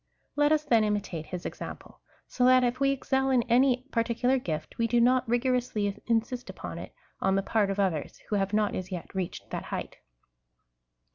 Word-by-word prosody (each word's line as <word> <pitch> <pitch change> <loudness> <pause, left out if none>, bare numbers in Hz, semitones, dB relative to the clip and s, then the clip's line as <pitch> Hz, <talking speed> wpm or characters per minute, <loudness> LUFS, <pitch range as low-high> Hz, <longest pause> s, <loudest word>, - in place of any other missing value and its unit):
Let 290 +1 +3
us, 310 -1 +3
then, 230 -6 +3
imitate 205 -7 -2
his 180 -1 -6
example, - - -7 0.3
so 250 - -1
that 255 0 +6
if 245 +1 0
we 275 0 +3
excel 270 0 0
in 255 -3 +3
any 250 +1 +3
parti 230 0 0
cular 255 +2 +1
gift, 155 +3 -4
we 230 - +2
do 240 +1 +2
not 250 0 +3
rigorously 240 -4 0
insist 235 +2 -1
upon - - -7
it - - -8 0.3
on 190 0 +2
the 195 - +1
part 210 -1 +1
of 195 +1 -2
others, 180 -7 -1
who 210 - 0
have 195 0 0
not 210 -1 +1
as 185 +1 -5
yet 175 -3 -6
reached 190 -2 -4
that - - -4
height. - - -5
230 Hz, 195 wpm, -28 LUFS, 195-255 Hz, 0.3 s, that